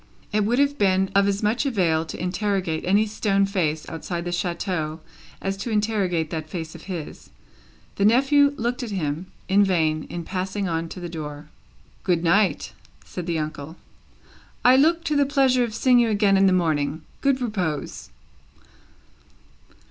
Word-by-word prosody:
It 210 -1 +2
would 235 +3 +1
have 285 +1 +2
been 190 -1 +2
of 200 0 +4
as 200 +1 -1
much 215 +4 +1
avail 175 - +1
to - - -7
interrogate 180 -3 -1
any 200 +4 +3
stone 205 -2 +1
face 160 -6 -1
outside 170 +1 -5
the 175 - -3
chateau 175 -3 -2 0.4
as 195 0 -2
to 200 - -5
interrogate 205 -7 0
that 155 -1 -4
face 160 -2 -5
of 165 - -12
his. 175 -5 -7 0.7
The 200 - +2
nephew 280 +5 +4
looked 240 +3 -2
at 240 - -4
him, 170 -3 -3 0.2
in 200 +2 +4
vain, 160 -5 +1
in 175 - -6
passing 190 +3 -3
on 165 -1 -2
to 185 - -8
the 175 - -5
door. 150 -2 -7 0.5
"Good 175 -3 +1
night!" 180 -1 +2 0.3
said 180 -1 -7
the 170 -1 0
uncle. 155 0 -5 0.9
"I 250 +1 +8
look 330 +5 +3
to 305 -3 -1
the 285 - +4
pleasure 265 -3 +3
of 225 -3 -4
seeing 250 +1 +4
you 235 -1 +3
again 205 -2 +3
in 195 0 +5
the - - +4
morning. 160 -3 0 0.2
Good 275 -1 +2
repose! 185 - -3
190 Hz, 165 wpm, -24 LUFS, 165-220 Hz, 0.9 s, I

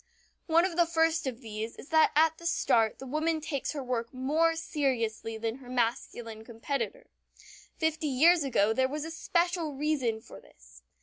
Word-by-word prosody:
One 335 +1 +4
of 355 -3 -3
the 345 -1 +4
first 325 -2 +1
of 250 -1 -4
these 220 0 -5
is - - -12
that 315 -1 +5
at 320 +1 +4
the 335 - -4
start 225 -9 +2
the 265 - -9
woman 310 +4 0
takes 295 -2 -3
her 285 -3 -4
work 235 -2 -2
more 305 +6 +1
seriously 230 -8 -2
than 225 +2 -3
her 255 -2 -13
masculine 230 -2 -2
competitor. 275 - -4 0.7
Fifty 320 -1 0
years 315 +5 +5
ago 220 -5 +2
there 260 +3 +1
was 300 +2 -4
special 340 -3 0
reason 270 -6 0
for - - -13
this. - - -19
275 Hz, 170 wpm, -29 LUFS, 230-320 Hz, 0.7 s, that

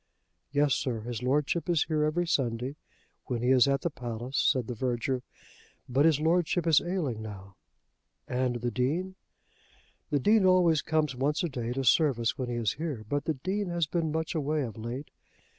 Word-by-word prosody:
"Yes, 145 -1 +3
sir; 120 -4 -1
his 120 0 -5
Lordship 145 +7 0
is 170 -3 +3
here 155 -2 0
every 170 +3 0
Sunday 125 -3 -1 0.5
when 120 -2 -2
he 125 - +3
is 130 0 +6
at 140 0 +1
the 170 - -1
palace," 120 +1 -6
said 130 -3 +2
the 125 - -4
verger. 125 +2 -1 0.7
"But 135 +4 +2
his 160 -3 +4
Lordship 170 +1 +1
is 160 -3 +5
ailing 165 - -2
now." 100 -3 -9 0.7
"And 125 -1 -1
the 120 0 -1
Dean?" 155 +10 -1 1.0
"The 150 - +2
Dean 210 - +4
always 180 -5 +4
comes 155 -4 0
once 145 +6 0
a 170 - 0
day 120 -3 -4
to 135 +1 -2
service 125 -3 +3
when 130 -2 -4
he 120 - -2
is 115 -3 0
here; 140 -10 -4
but 145 0 -1
the 160 - 0
Dean 190 +8 -2
has 170 -1 0
been 160 0 -1
much 160 +1 -2
away 150 -1 0
of 115 -5 -6
late. 120 +6 -6
140 Hz, 185 wpm, -29 LUFS, 125-160 Hz, 1.0 s, is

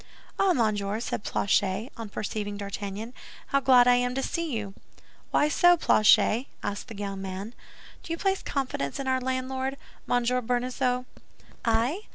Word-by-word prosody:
"Ah, 390 -1 +4
monsieur," 215 -5 0
said 230 - -3
Planchet, 200 +5 0
on 230 -3 -7
perceiving 205 0 -4
D'Artagnan, 200 +3 -5 0.4
"how 275 - +3
glad 255 -2 +6
I 245 0 +6
am 245 0 0
to 270 - -1
see 335 -2 -2
you." 210 -5 -3 0.6
"Why 295 - +3
so, 350 +4 +5
Planchet?" 225 -1 +4 0.2
asked 205 +3 -4
the 225 -4 -9
young 200 -1 -4
man. 195 +4 -6 0.5
"Do - - -9
you 330 - -1
place 385 +2 0
confidence 255 - -3
in 275 - -3
our 260 0 +1
landlord—Monsieur 255 -1 -2
Bonacieux?" 250 +1 -1 0.6
"I? 235 - +1
245 Hz, 150 wpm, -27 LUFS, 205-265 Hz, 0.6 s, glad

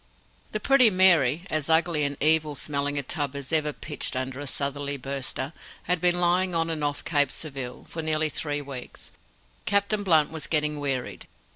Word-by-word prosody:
The 215 - -2
Pretty 255 +1 +5
Mary 175 -6 +4
as 155 -1 -1
ugly 160 -1 +2
and 140 -1 -1
evil 155 0 +3
smelling 145 0 -2
a 140 - 0
tub 145 0 -3
as 140 0 -6
ever 155 -2 +3
pitched 150 -1 -4
under 130 +1 -3
a 145 - -5
southerly 140 +1 -2
burster 135 +1 -4 0.3
had 180 -1 0
been 175 0 +3
lying 180 +1 +2
on 165 0 +1
and 155 -2 -3
off 145 0 -2
Cape 145 -3 +2
Surville 135 -4 -5
for 165 - -5
nearly 155 0 +1
three 145 -1 -2
weeks. 135 -3 -9 0.5
Captain 200 +1 +1
Blunt 160 -7 +3
was 155 -1 -3
getting 150 -1 0
wearied. 135 -3 -3
150 Hz, 175 wpm, -26 LUFS, 140-165 Hz, 0.5 s, Pretty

